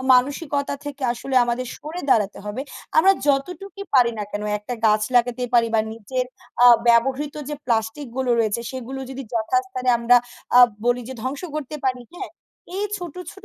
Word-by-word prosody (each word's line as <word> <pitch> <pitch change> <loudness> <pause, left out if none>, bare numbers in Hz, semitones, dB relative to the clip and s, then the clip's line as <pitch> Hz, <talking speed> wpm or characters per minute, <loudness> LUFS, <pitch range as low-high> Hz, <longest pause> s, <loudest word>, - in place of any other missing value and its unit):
আ - - -6
মানসিকতা 280 +2 0
থেকে 290 -1 -7
আসলে 260 +2 -5
আমাদের 240 +1 -2
সরে 315 +4 -6
দাঁড়াতে 205 -5 +2
হবে। 225 +6 -4 0.4
আমরা 385 +5 +7
যতটুকুই 360 +8 -1
পারি 245 -3 +5
না 210 - -2
কেন 205 0 -3 0.2
একটা 225 +4 -5
গাছ 215 0 +3
লাগাতে 245 +1 +2
পারি 230 -1 +5
বা 220 - +5
নিজের 240 +4 -3 0.4
আ - - +10 0.2
ব্যবহৃত 265 +5 +3
যে 300 - -3
প্লাস্টিক 230 +4 -1
গুলো 260 -2 0
রয়েছে 220 0 +1
সেগুলো 260 0 -6
যদি 265 +1 -6
যথাস্থানে 255 +3 -1
আমরা 235 +1 +5 0.4
আ - - +10 0.3
বলি 245 0 +2
যে 260 - -6
ধ্বংস 270 +6 -4
করতে 305 0 -4
পারি। 250 -1 -1
হ্যাঁ? - - -7 0.5
এই 415 - 0
ছোট, 350 -4 -7 0.2
ছোট 395 - -16
255 Hz, 175 wpm, -22 LUFS, 235-285 Hz, 0.5 s, আ